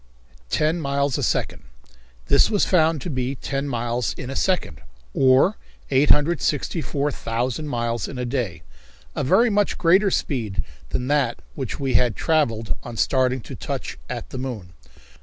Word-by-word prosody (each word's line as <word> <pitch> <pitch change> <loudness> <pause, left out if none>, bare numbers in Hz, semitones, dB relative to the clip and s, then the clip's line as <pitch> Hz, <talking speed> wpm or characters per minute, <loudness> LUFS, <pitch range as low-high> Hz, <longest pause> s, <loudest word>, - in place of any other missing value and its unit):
Ten 155 - +1
Miles 140 -2 0
A - - -1
Second! - - -1 0.6
This 140 - +4
was 205 -3 +2
found 160 -4 +3
to 175 - -5
be 130 0 -2
ten 140 +1 -3
miles 120 -2 -1
in 125 - -6
a - - -5
second, 175 - 0 0.3
or 130 - +4 0.3
864,000 145 -3 +1
miles 120 -4 -2
in 135 - -7
a 125 - -2
day, 115 -10 -3 0.5
a - - -1
very 220 - +4
much 205 0 +1
greater 185 +4 +4
speed 110 - -1 0.3
than 125 - -2
that 145 -5 +2
with 70 - -24
which - - -5
we 135 -2 -1
had 120 0 +3
travelled 115 -9 +1
on 120 -2 -8
starting 130 0 +2
to - - -9
touch - - -5
at - - -6
the 130 - -5
moon. 110 -9 -6
130 Hz, 155 wpm, -23 LUFS, 120-150 Hz, 0.6 s, This